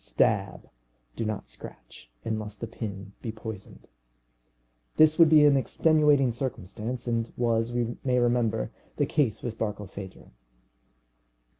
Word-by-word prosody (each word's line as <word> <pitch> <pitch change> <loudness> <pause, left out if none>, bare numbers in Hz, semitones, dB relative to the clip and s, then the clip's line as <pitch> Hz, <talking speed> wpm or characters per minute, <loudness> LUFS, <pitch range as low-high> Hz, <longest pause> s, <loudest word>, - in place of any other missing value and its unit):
Stab, - - 0 0.5
do - - -3
not 110 -1 -4
scratch, - - -12 0.2
unless 105 -1 -3
the 110 - -5
pin 100 -3 -7
be 115 - -4
poisoned. 110 -3 -9 1.1
This 155 +1 +5
would 165 -2 +8
be 150 -1 +7
an 145 -1 +6
extenuating 145 0 +3
circumstance, 115 -1 -5
and 115 -1 -1
was, 115 -1 +1
we 120 -1 -2
may 125 -1 +1
remember, 120 - +1 0.3
the - - +2
case 120 -8 0
with 115 -2 -5
Barkilphedro. 100 -3 -6
115 Hz, 125 wpm, -27 LUFS, 105-125 Hz, 1.1 s, would